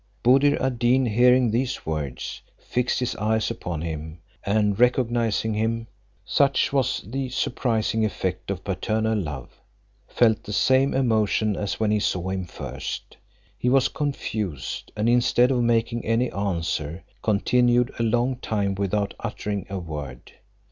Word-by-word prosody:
Buddir 135 +4 +5
ad 130 -2 -1
Deen 125 +2 +3
hearing 125 +1 +4
these 125 +3 -1
words, 75 -5 -4 0.2
fixed 125 +1 -1
his 125 - -1
eyes 110 +2 0
upon 85 -8 -4
him, 80 -1 -5 0.3
and 105 0 +1
recognizing 120 -3 +2
him 115 +2 -1 0.4
(such 140 0 +2
was 135 -2 +1
the 130 +5 -3
surprising 115 -3 0
effect 95 -4 -2
of 95 -2 -3
paternal 110 +3 0
love!), 75 - -5 0.5
felt 110 -3 +3
the 105 - -6
same 130 +5 +3
emotion 110 -4 +2
as 100 0 -3
when 110 -1 +1
he 105 - +2
saw 90 -2 -1
him 95 -1 -2
first; - - -7 0.4
he 125 - 0
was 135 0 +4
confused, 110 - -4
and 105 +2 +1
instead 120 +1 +4
of 125 -2 +2
making 115 0 +1
any 115 +2 +1
answer, 85 -4 -2 0.2
continued 120 +3 +2
a - - +1
long 120 +3 +1
time 100 -5 -1
without 100 +1 -1
uttering 100 -3 -4
a 100 - -3
word. 75 -7 -7
110 Hz, 140 wpm, -24 LUFS, 100-125 Hz, 0.5 s, Buddir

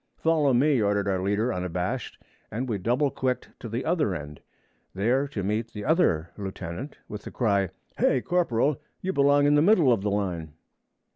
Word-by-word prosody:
'Follow 155 -4 +2
me,' 130 +1 +3
ordered 100 -1 +1
our 95 -2 0
leader 105 +5 0
unabashed; 90 +7 -3 0.3
and 120 +4 -3
we 110 -5 -2
double 125 +8 +1
quicked 130 -1 -2
to 115 - -7
the 115 +4 -3
other 160 - +1
end, 75 -2 -8 0.5
there 125 +8 +1
to 110 -8 -4
meet 110 +4 -1
the 105 -1 -6
other 90 - +2
lieutenant, 95 - -6
with 105 -1 -7
the - - -8
cry, 100 -6 +1 0.3
'Hay, 130 - +3
corporal! 150 -3 +1 0.2
you 190 +1 -2
belong 145 -1 +4
in 145 - +4
the 150 - +5
middle 165 - +5
of 110 - -1
the 105 - -1
line!' 90 -6 -2
115 Hz, 180 wpm, -26 LUFS, 100-140 Hz, 0.5 s, the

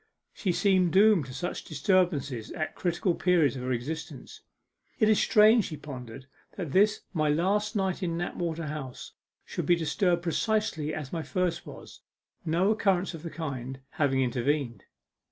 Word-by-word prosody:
She 190 - -1
seemed 180 0 +2
doomed 195 -7 +5
to 130 - -9
such 175 - -4
disturbances 145 - 0
at 155 -3 -3
critical 175 0 0
periods 165 -8 +2
of 130 - -5
her 130 +1 -2
existence. 145 +6 -5 0.6
'It 215 - +3
is 215 -1 +4
strange,' 215 -1 +5
she 155 - -6
pondered, 130 -3 -9 0.3
'that 175 -7 -4
this 210 +6 +3
my 155 -3 +1
last 200 +8 +1
night 190 -2 -1
in 170 -2 -1
Knapwater 170 -1 -3
House 145 -4 -6 0.3
should - - -4
be 175 - +5
disturbed 170 +2 0
precisely 170 -4 0
as 150 -2 -6
my 165 - -2
first 180 +1 -2
was, - - -11 0.4
no 175 +5 +2
occurrence 195 -4 +1
of 165 - -8
the 165 - -6
kind 135 -5 -5
having 135 -3 +1
intervened. 125 -3 -1
165 Hz, 155 wpm, -28 LUFS, 145-185 Hz, 0.6 s, doomed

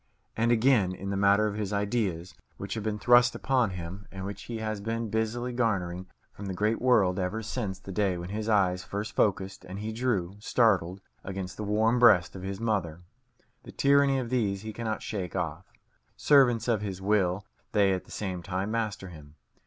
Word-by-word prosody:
And 115 +1 +2
again, 115 -5 +3
in 100 +2 -5
the - - -1
matter 100 +2 +4
of 105 - -1
his 105 -1 -3
ideas, 100 -4 -1 0.2
which 100 -1 -5
have 110 - -4
been 105 -1 -2
thrust 120 +2 +5
upon 130 -5 +1
him, 90 +2 -7
and 95 0 -6
which 100 +1 -7
he 115 - -5
has 110 -2 -3
been 115 0 -3
busily 115 +3 -1
garnering 95 -7 -1 0.2
from 100 - -8
the 95 - -4
great 105 +4 0
world 105 -8 +3
ever 95 +5 -2
since 105 -3 -3
the 95 - -10
day 95 -2 0
when 85 +1 -6
his 110 +2 -3
eyes 90 -4 +2
first 105 +4 -5
focussed 95 -2 0
and 95 +1 -8
he 105 +2 -4
drew, 110 -6 -1
startled, 100 -5 +2 0.2
against 95 -1 -5
the 105 - -5
warm 110 +3 +2
breast 100 -8 +5
of 95 - -7
his 95 +1 -5
mother 90 -7 -2 0.6
the - - -11
tyranny 140 -1 +3
of 125 -2 -3
these 105 -6 0
he 110 0 -6
cannot 110 -1 -3
shake 95 -5 -4
off. - - -4 0.5
Servants 130 -6 +4
of 115 -4 +1
his 95 -3 -4
will, 95 -1 +1 0.3
they 100 -2 +3
at 95 - -3
the - - -20
same 95 -4 -4
time 95 +3 -3
master 110 -4 -2
him. 75 -3 -13
105 Hz, 195 wpm, -28 LUFS, 95-115 Hz, 0.6 s, thrust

